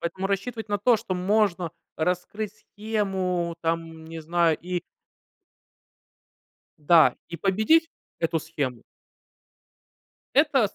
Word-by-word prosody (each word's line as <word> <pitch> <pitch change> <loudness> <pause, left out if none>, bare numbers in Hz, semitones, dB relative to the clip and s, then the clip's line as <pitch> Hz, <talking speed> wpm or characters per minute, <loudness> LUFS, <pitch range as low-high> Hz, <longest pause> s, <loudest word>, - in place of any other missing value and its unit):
поэтому 185 +3 -2
рассчитывать 215 +3 -3
на 205 0 0
то, 235 +3 +4
что 205 -3 -4
можно 185 -2 +1 0.3
раскрыть 180 +5 -2
схему, 195 -5 -2
там, 165 -1 -3
не 165 0 -7
знаю, 165 0 +2
и 180 0 -3 2.0
да, 160 +1 +5
и 170 - -6
победить 220 - +3 0.3
эту 165 0 +1
схему 145 -7 -4 1.5
это - - +4
с - - -23
180 Hz, 105 wpm, -26 LUFS, 165-205 Hz, 2.0 s, да